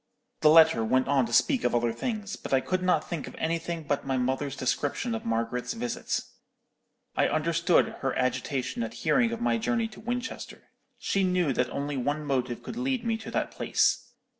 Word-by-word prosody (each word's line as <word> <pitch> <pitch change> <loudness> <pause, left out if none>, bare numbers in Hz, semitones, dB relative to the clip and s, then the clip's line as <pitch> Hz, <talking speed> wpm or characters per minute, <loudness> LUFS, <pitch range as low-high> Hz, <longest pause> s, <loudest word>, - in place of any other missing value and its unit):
'_ - - -47
"The 155 - +6
letter 160 -7 +7
went 130 +4 +2
on 135 -3 +3
to - - -8
speak 265 - +3
of - - +1
other 120 -1 +1
things; 210 - -3
but - - -1
I - - +4
could 185 +7 -1
not 180 -4 +1
think 165 -5 -4
of - - -9
anything 165 0 -2
but 145 -1 -1
my 135 -1 -1
mother's 130 +2 -1
description 145 - -1
of 225 - -4
Margaret's 115 - -1
visit. 235 +1 -2 0.9
I - - +3
understood 170 +3 +2
her 135 - -1
agitation 130 0 -1
at 115 0 -4
hearing 240 -3 +3
of 235 0 -4
my 235 - +1
journey 230 0 0
to 215 - -13
Winchester. 245 +2 -5 0.3
She 195 - 0
knew 180 -6 +2
that 125 0 0
only 140 +1 -3
one 145 +4 -1
motive 130 -4 -1
could 230 - -7
lead 255 -1 -1
me 225 -1 +1
to 220 - -8
that - - -1
place. - - +1
155 Hz, 195 wpm, -28 LUFS, -, 0.9 s, letter